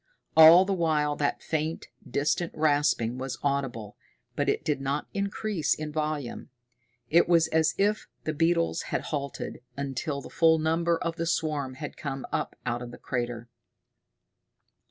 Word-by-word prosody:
All 160 +3 +9
the 195 - 0
while 155 -4 +1
that 145 - -1
faint, 160 +1 -2 0.2
distant 150 +6 0
rasping 145 -6 +1
was 135 0 -4
audible, 135 -7 -2 0.4
but - - 0
it - - -1
did 145 -3 0
not 140 +2 -1
increase 200 -4 -1
in 155 0 -5
volume. 150 -4 -3 0.6
It 170 +2 +5
was 165 -2 +5
as 160 0 +2
if 210 +2 +1 0.2
the 155 - -2
beetles 165 +2 +1
had - - -1
halted 140 -4 -4 0.2
until 140 +1 -3
the 140 - -10
full 160 -1 +4
number 165 +2 +1
of 165 0 -3
the 165 0 -2
swarm 150 -5 -1
had 145 +2 -7
come 135 -2 -5
up - - -2
out 120 0 -1
of 120 - -6
the 120 - -10
crater. 120 -2 -4
150 Hz, 155 wpm, -27 LUFS, 135-165 Hz, 0.6 s, All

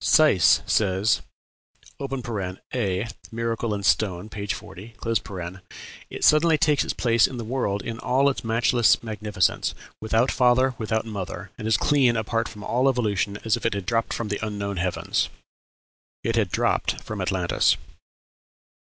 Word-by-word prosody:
Seiss 100 - +5
says 100 +1 +2 0.8
("A, 110 -5 -3 0.2
Miracle 115 0 -2
in 100 -1 -3
Stone," 95 -1 +1
p. 100 -1 -6
40), 100 +3 -7 1.1
"It - - -7
suddenly 155 +1 +5
takes 150 -1 +3
its - - -2
place 115 -2 +3
in 130 - -7
the 120 - -4
world 110 -5 -1
in 115 0 -5
all 135 +4 +2
its 140 - -1
matchless 115 -1 +3
magnificence, 105 -4 -1 0.3
without 110 +3 +2
father, 130 +1 +3
without 110 0 -1
mother, 100 -3 -6
and 110 - -5
as 110 -1 +4
clean 130 -5 +3
apart 115 +1 -1
from 105 -2 -10
all 130 +5 +2
evolution 105 -5 0
as 110 - +3
if - - -8
it - - 0
had 100 -2 -4
dropped 115 +1 0
from 115 -2 -3
the 100 +1 -3
unknown 100 -2 -3
heavens." 90 0 -1 0.9
It 115 - 0
had 110 -5 +1
dropped - - 0
from - - -5
Atlantis. - - +2
110 Hz, 145 wpm, -24 LUFS, 100-120 Hz, 1.1 s, Seiss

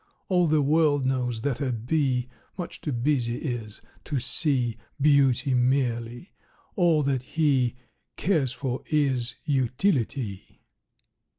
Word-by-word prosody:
"All 180 -2 +3
the 155 -1 +3
world 145 -2 +3
knows 125 -3 -1
that 140 -1 -1
a 135 -2 0
bee 125 +1 0 0.3
Much 180 - -6
too 150 - -3
busy 120 -1 0
is 120 -6 -5 0.2
to 145 -4 -1
see 125 -3 +1 0.2
Beauty 140 -2 +3
merely. 125 - 0 0.4
All 170 -5 +3
that 135 -2 0
he 130 -3 +1 0.4
Cares 155 -9 +1
for 125 0 -4
is 135 -6 0
utility." 130 - -1
135 Hz, 115 wpm, -26 LUFS, 120-150 Hz, 0.4 s, All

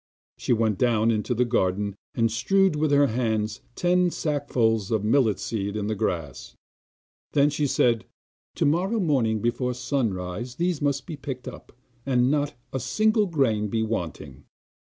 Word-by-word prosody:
She - - -2
went 110 -4 +2
down 115 -2 +3
into 115 +3 -1
the 125 +2 +2
garden 100 -3 0 0.2
and 115 -1 +2
strewed 195 - +2
with 155 +1 +1
her 145 0 +5
own 140 - +3
hands 110 -2 -1
ten 180 0 +2
sacksful 120 - 0
of 110 -2 +1
millet 110 -1 +3
seed 100 -2 -3
on 105 - -2
the 110 - -1
grass; 80 - -3 0.8
then 145 0 +4
she 145 0 0
said: 120 -3 +2 0.5
'Tomorrow 185 +9 +1
morning 125 - +1
before 125 +1 0
sunrise 120 -4 -2
these 175 -3 -1
must 145 -1 0
be 160 -5 -7
picked 130 -2 -6
up, - - -9 0.3
and 125 -1 +2
not 145 0 0 0.2
a 130 - -1
single 215 - +2
grain 120 - +1
be 110 +2 -1
wanting. 85 - -5
120 Hz, 155 wpm, -25 LUFS, 110-145 Hz, 0.8 s, her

